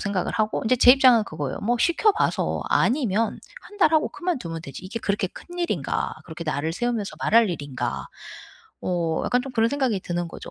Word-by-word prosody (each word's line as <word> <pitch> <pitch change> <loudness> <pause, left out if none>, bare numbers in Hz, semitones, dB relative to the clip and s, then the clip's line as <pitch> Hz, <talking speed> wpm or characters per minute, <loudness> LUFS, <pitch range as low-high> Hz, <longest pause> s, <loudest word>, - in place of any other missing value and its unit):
생각을 200 -3 -2
하고 215 -1 0
이제 255 - +3
제 250 0 +8
입장은 255 -5 +5
그거예요. 150 -6 -5
'뭐 240 +3 +1
시켜봐서 395 - +1
아니면 230 -4 +1 0.2
1 415 - -14
달 325 -4 +4
하고 315 - +3
그만두면 250 - -4
되지 155 +4 -9
이게 230 +5 -5
그렇게 200 -1 0
큰 350 - -12
일인가 345 -1 -1
그렇게 170 0 -8
날을 155 +1 -2
세우면서 230 +1 -2
말할 225 -2 +4
일인가.' 145 -6 -4 0.8
어 170 -3 -1
약간 250 0 +1
좀 270 - -7
그런 225 -1 +2
생각이 260 -6 0
드는 175 -1 -3
거죠. - - -10
220 Hz, 390 characters per minute, -24 LUFS, 175-255 Hz, 0.8 s, 제